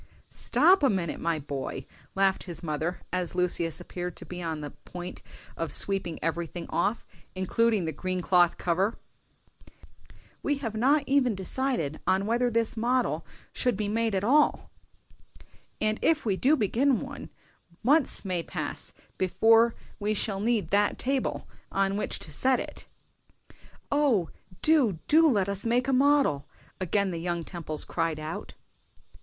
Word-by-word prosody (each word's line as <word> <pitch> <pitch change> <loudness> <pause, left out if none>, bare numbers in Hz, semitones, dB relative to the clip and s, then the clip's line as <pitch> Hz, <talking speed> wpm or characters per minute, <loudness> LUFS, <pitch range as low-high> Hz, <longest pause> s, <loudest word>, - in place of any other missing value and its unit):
"Stop 380 +2 +4
a 275 - +4
minute, 180 -5 -1
my 165 -1 0
boy!" 140 -2 -5 0.3
laughed 195 0 +2
his 175 -1 -8
mother, 160 +2 -2
as 180 -1 -2
Lucius 175 -2 0
appeared 175 0 -6
to - - -9
be 180 0 -7
on 160 -2 -3
the 145 -1 -6
point 180 0 -9 0.3
of 165 -1 -3
sweeping 195 -4 +2
everything 170 +1 -3
off, 205 +6 0 0.3
including 205 +1 +1
the 160 - -1
green 185 +4 -3
cloth 175 -1 +3
cover; 190 +6 0 1.4
"we 290 -1 0
have 235 -6 -4
not 275 +7 +3
even 265 -5 +2
decided 190 - -1
on 190 +1 +2
whether 240 +3 +1
this 230 -1 0
model 245 +2 0 0.3
should 250 -6 +1
be 210 -1 -1
made 225 0 0
at 190 - 0
all; 290 +7 +3 1.1
and 215 0 0
if 320 -4 +2
we 200 -4 +1
do 270 +10 +3
begin 255 +2 +2
one, - - -8 0.5
months 280 -2 +3
may 180 -3 -1
pass - - -5 0.3
before 225 +5 +4 0.2
we 210 +1 0
shall 200 -1 -2
need 225 0 0
that 205 +1 +2
table 270 +1 -2 0.2
on 195 0 +1
which 210 - -2
to 155 - -9
set 255 - +2
it - - -7 0.6
up." - - -25 0.4
"O, 265 - +2 0.3
do, 275 - +4
do 320 +1 +6
let 200 -7 +2
us 200 0 -2
make 240 +3 +1
a 270 - +1
model!" 275 - +3 0.3
again 190 +2 0
the 170 - -4
young 175 -1 -2
Temples 160 -3 -4
cried 165 -2 -1
out. 155 +1 -6
200 Hz, 150 wpm, -28 LUFS, 175-245 Hz, 1.4 s, do